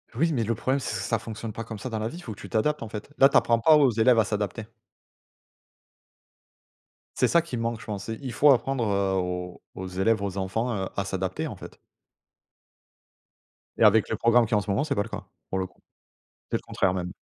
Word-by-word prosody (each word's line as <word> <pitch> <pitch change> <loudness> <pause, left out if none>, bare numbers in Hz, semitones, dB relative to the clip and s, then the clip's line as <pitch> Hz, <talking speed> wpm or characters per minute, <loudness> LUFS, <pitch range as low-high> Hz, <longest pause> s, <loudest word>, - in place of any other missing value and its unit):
Oui 165 +7 +2
mais 125 -6 0
le 115 +2 0
problème, 130 +5 0
ç - - -8
ça 115 - -1
fonctionne 115 0 -6
pas 115 +2 -6
comme 110 -1 -7
ça 130 - -5
dans 110 -2 -3
la 110 - -2
vie, 170 +10 -8
faut 115 - -7
que 105 - -16
tu - - -9
t'adaptes, 150 +7 0
en 115 - -5
fait. 105 +3 -7
Là 135 - +8
tu 140 - -5
apprends 115 -1 +3
pas 155 +7 +6
aux 140 -4 +5
élèves 115 +2 +4
à - - +5
s'adapter. 105 0 -3 2.5
C'est - - +4
ça 170 - +4
qui 160 -7 -6
manque, 115 -1 -2
je - - -11
pense: 100 0 -5
il 125 +3 -5
faut 145 +5 +5
apprendre, 135 0 +1
heu, 100 -1 +1
aux 90 -1 -3
aux 95 - -6
élèves, 95 +4 +1
aux 100 -1 -3
enfants, 105 +6 -1
heu, - - -4
à 100 - 0
s'adapter, 95 -1 -3
en - - -7
fait - - -12 2.0
Et - - +2
avec 110 0 +5
le 110 - -1
programme 115 0 +4
qu'il 115 - -9
y - - +5
a - - +4
en 105 - +1
ce 100 - -8
moment, 100 +7 +1
c'est 155 - -1
pas 100 - +1
le 115 - -10
cas, - - -6 0.3
pour 95 - -1
le 95 - -2
coup. - - -30 0.7
C'est - - +1
le - - -11
contraire, 95 - 0
même. 90 -1 -3
110 Hz, 235 wpm, -26 LUFS, 100-120 Hz, 2.5 s, Là